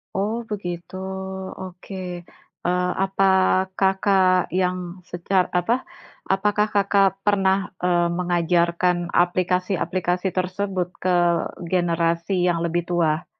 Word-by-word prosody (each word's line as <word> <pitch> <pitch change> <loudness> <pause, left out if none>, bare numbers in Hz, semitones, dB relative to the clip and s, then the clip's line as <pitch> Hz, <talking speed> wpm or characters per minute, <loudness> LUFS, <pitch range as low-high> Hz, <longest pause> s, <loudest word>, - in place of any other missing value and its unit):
Oh, 220 +4 -1
begitu, 175 -3 -5 0.7
oke. 185 +1 -9 0.7
Eee, 180 0 +1
apa 195 0 +1 0.5
Kakak 190 -2 +3
yang 185 0 +1 0.3
secar 180 +2 +1
apa, 180 +7 +2 0.6
apakah 210 +2 +1
Kakak, 200 0 +3
eee, 195 - -49
pernah 195 -2 +3 0.6
mengajarkan 175 0 +1
aplikasi-aplikasi 180 0 0
tersebut 185 0 -1
ke 185 -1 +2 0.6
generasi 170 +1 +1
yang 170 -1 +1
lebih 170 +1 0
tua? 165 -2 +1
180 Hz, 95 wpm, -23 LUFS, 175-195 Hz, 0.7 s, Kakak